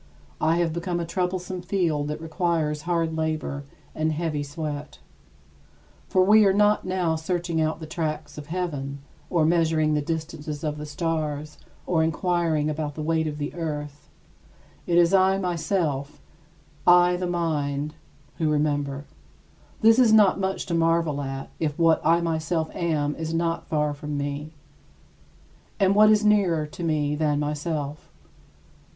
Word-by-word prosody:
I 160 Hz, +1 st, +3 dB
have 170 Hz, -2 st, +1 dB
become 175 Hz, +1 st, -2 dB
a 170 Hz, -, -2 dB
troublesome 180 Hz, +1 st, -2 dB
field 170 Hz, -6 st, 0 dB
that 150 Hz, -, -4 dB
requires 160 Hz, -2 st, -1 dB
hard 165 Hz, -2 st, 0 dB
labor 155 Hz, -3 st, -2 dB, 0.3 s
and 155 Hz, 0 st, 0 dB
heavy 155 Hz, -1 st, -2 dB
sweat. 145 Hz, 0 st, -5 dB, 1.1 s
For 185 Hz, -, +3 dB
we 215 Hz, +3 st, +6 dB
are 195 Hz, -2 st, +4 dB
not 210 Hz, +1 st, +3 dB
now 185 Hz, -3 st, 0 dB
searching 170 Hz, 0 st, -1 dB
out 155 Hz, +1 st, 0 dB
the 160 Hz, -, -7 dB
tracts 155 Hz, -2 st, -4 dB
of 150 Hz, -1 st, -9 dB
heaven, 145 Hz, -6 st, -4 dB, 0.3 s
or 165 Hz, -3 st, +2 dB
measuring 160 Hz, -2 st, +2 dB
the 150 Hz, -, +1 dB
distances 155 Hz, -1 st, -4 dB
of 150 Hz, -1 st, -2 dB
the 150 Hz, -, -6 dB
stars 150 Hz, -1 st, -3 dB, 0.3 s
or 170 Hz, -3 st, +1 dB
inquiring 165 Hz, -2 st, +1 dB
about 150 Hz, -1 st, -3 dB
the 155 Hz, -, -4 dB
weight 160 Hz, 0 st, +1 dB
of 150 Hz, -1 st, -4 dB
the 145 Hz, -1 st, -4 dB
earth. 150 Hz, -3 st, -5 dB, 0.8 s
It 170 Hz, -, +2 dB
is 175 Hz, +1 st, +5 dB
I 190 Hz, 0 st, +4 dB
myself 165 Hz, -6 st, -1 dB, 0.7 s
I, 175 Hz, 0 st, +6 dB
the 180 Hz, 0 st, -2 dB
mind 150 Hz, -4 st, -1 dB, 0.5 s
who 160 Hz, -2 st, +1 dB
remember. 145 Hz, -2 st, 0 dB, 0.8 s
This 225 Hz, +2 st, +6 dB
is 240 Hz, -4 st, +5 dB
not 210 Hz, -3 st, +5 dB
much 190 Hz, 0 st, -2 dB
to 175 Hz, -, -4 dB
marvel 165 Hz, -3 st, +1 dB
at, 135 Hz, -1 st, -5 dB
if 150 Hz, -2 st, -1 dB
what 165 Hz, -1 st, +4 dB
I 165 Hz, +2 st, +4 dB
myself 160 Hz, 0 st, -1 dB
am 150 Hz, -4 st, -1 dB
is 160 Hz, 0 st, -3 dB
not 165 Hz, 0 st, -1 dB
far 150 Hz, -1 st, 0 dB
from 145 Hz, 0 st, -5 dB
me. 145 Hz, +2 st, -4 dB, 1.3 s
And 195 Hz, -1 st, +4 dB
what 215 Hz, +1 st, +6 dB
is 215 Hz, 0 st, +4 dB
nearer 190 Hz, -7 st, +3 dB
to 150 Hz, +3 st, -8 dB
me 150 Hz, -3 st, 0 dB
than 150 Hz, -1 st, +1 dB
myself? 150 Hz, 0 st, -3 dB
160 Hz, 150 wpm, -25 LUFS, 150-175 Hz, 1.3 s, we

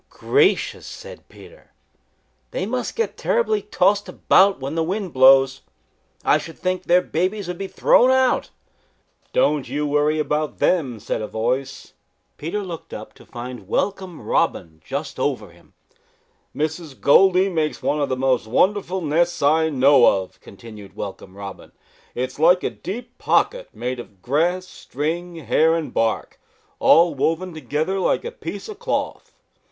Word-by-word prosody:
"Gracious!" 420 Hz, -2 st, +1 dB
said -, -, -11 dB
Peter. -, -, -17 dB, 0.8 s
"They -, -, -3 dB
must -, -, -3 dB
get 460 Hz, -, -2 dB
terribly 440 Hz, -3 st, +1 dB
tossed 205 Hz, -, +1 dB
about 195 Hz, -2 st, +3 dB
when 135 Hz, +2 st, -5 dB
the 165 Hz, -, 0 dB
wind 190 Hz, +1 st, -3 dB
blows. 135 Hz, 0 st, +5 dB, 0.6 s
I -, -, +4 dB
should 165 Hz, -, -10 dB
think 185 Hz, 0 st, -1 dB
their 180 Hz, +1 st, +4 dB
babies 185 Hz, +4 st, -2 dB
would 180 Hz, -1 st, -5 dB
be 195 Hz, -, -3 dB
thrown 250 Hz, +5 st, +4 dB
out." 260 Hz, -1 st, +2 dB, 0.8 s
"Don't 150 Hz, -, +1 dB
you 150 Hz, +1 st, -2 dB
worry 150 Hz, +1 st, +1 dB
about 150 Hz, -2 st, -1 dB
them," 135 Hz, -11 st, +1 dB
said 110 Hz, -, -3 dB
a 105 Hz, -, -4 dB
voice. 130 Hz, +5 st, -3 dB, 0.4 s
Peter 185 Hz, +7 st, -3 dB
looked 170 Hz, -4 st, -8 dB
up -, -, -9 dB
to -, -, -18 dB
find 120 Hz, -4 st, -8 dB
Welcome 190 Hz, -, -2 dB
Robin 80 Hz, -1 st, -1 dB
just 140 Hz, 0 st, -5 dB
over 130 Hz, -7 st, -2 dB
him. 85 Hz, 0 st, -22 dB, 0.8 s
"Mrs. 155 Hz, -2 st, -4 dB
Goldy 185 Hz, +5 st, +5 dB
makes 160 Hz, -5 st, -2 dB
one 150 Hz, 0 st, 0 dB
of 140 Hz, -, 0 dB
the 130 Hz, -, -1 dB
most 130 Hz, -3 st, +1 dB
wonderful 190 Hz, -, +1 dB
nests 170 Hz, +1 st, 0 dB
I 160 Hz, +2 st, +3 dB
know 135 Hz, -2 st, +5 dB, 0.2 s
of," 90 Hz, -, -17 dB
continued 105 Hz, -1 st, -13 dB
Welcome 95 Hz, -1 st, -8 dB
Robin. 100 Hz, -1 st, -9 dB, 0.4 s
"It 125 Hz, -, -1 dB
is -, -, -16 dB
like 175 Hz, +3 st, +5 dB
a -, -, -1 dB
deep 240 Hz, +5 st, -8 dB
pocket -, -, +1 dB
made 125 Hz, 0 st, -4 dB
of 100 Hz, -6 st, -12 dB
grass, 170 Hz, +8 st, 0 dB
string, 170 Hz, +5 st, -4 dB
hair 160 Hz, +2 st, +2 dB
and 165 Hz, -2 st, -4 dB
bark, 115 Hz, -1 st, -1 dB, 0.4 s
all 170 Hz, 0 st, +5 dB
woven 165 Hz, +6 st, -1 dB
together 155 Hz, +6 st, -2 dB
like 190 Hz, -, 0 dB
a 475 Hz, -, -4 dB
piece -, -, -7 dB
of 430 Hz, -2 st, -9 dB
cloth. 485 Hz, +1 st, -3 dB
160 Hz, 155 wpm, -22 LUFS, 130-185 Hz, 0.8 s, blows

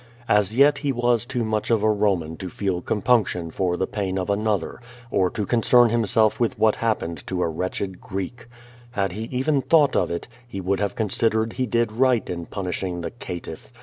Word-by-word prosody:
As 105 Hz, 0 st, +2 dB
yet 140 Hz, +1 st, +5 dB
he 140 Hz, -1 st, 0 dB
was 120 Hz, -1 st, +1 dB
too 125 Hz, -2 st, -1 dB
much 110 Hz, -1 st, -1 dB
of 115 Hz, -3 st, +2 dB
a 110 Hz, -, +4 dB
Roman 95 Hz, -7 st, 0 dB
to 95 Hz, -, -6 dB
feel 95 Hz, -1 st, -2 dB
compunc 110 Hz, +2 st, +2 dB
tion 85 Hz, -2 st, -4 dB
for 90 Hz, 0 st, -1 dB
the 95 Hz, -, 0 dB
pain 95 Hz, -2 st, -3 dB
of 95 Hz, +2 st, -1 dB
another, 105 Hz, 0 st, -1 dB, 0.3 s
or 95 Hz, -1 st, +2 dB
to 105 Hz, -, -3 dB
concern 120 Hz, +2 st, +4 dB
himself 110 Hz, +1 st, +2 dB
with 120 Hz, -2 st, 0 dB
what 110 Hz, -1 st, +3 dB
liappened 85 Hz, -9 st, -2 dB
to 90 Hz, -1 st, -1 dB
a -, -, +1 dB
wretched 90 Hz, +3 st, -4 dB
Ctreek. 100 Hz, +6 st, -6 dB, 0.5 s
Had 100 Hz, -4 st, 0 dB
he 110 Hz, +5 st, -5 dB
even 135 Hz, +4 st, 0 dB
thought 150 Hz, -2 st, +4 dB
of -, -, +2 dB
it, 85 Hz, -, -4 dB, 0.2 s
he 100 Hz, -5 st, -6 dB
would 95 Hz, +1 st, 0 dB
have 100 Hz, -3 st, -1 dB
considered 110 Hz, +1 st, 0 dB
he 130 Hz, -1 st, -1 dB
did 115 Hz, 0 st, +1 dB
right 125 Hz, 0 st, +2 dB
in 85 Hz, -1 st, -5 dB
punishing 90 Hz, -2 st, -3 dB
the 85 Hz, -, -4 dB
caitiff. 85 Hz, -7 st, -8 dB
105 Hz, 200 wpm, -23 LUFS, 95-120 Hz, 0.5 s, yet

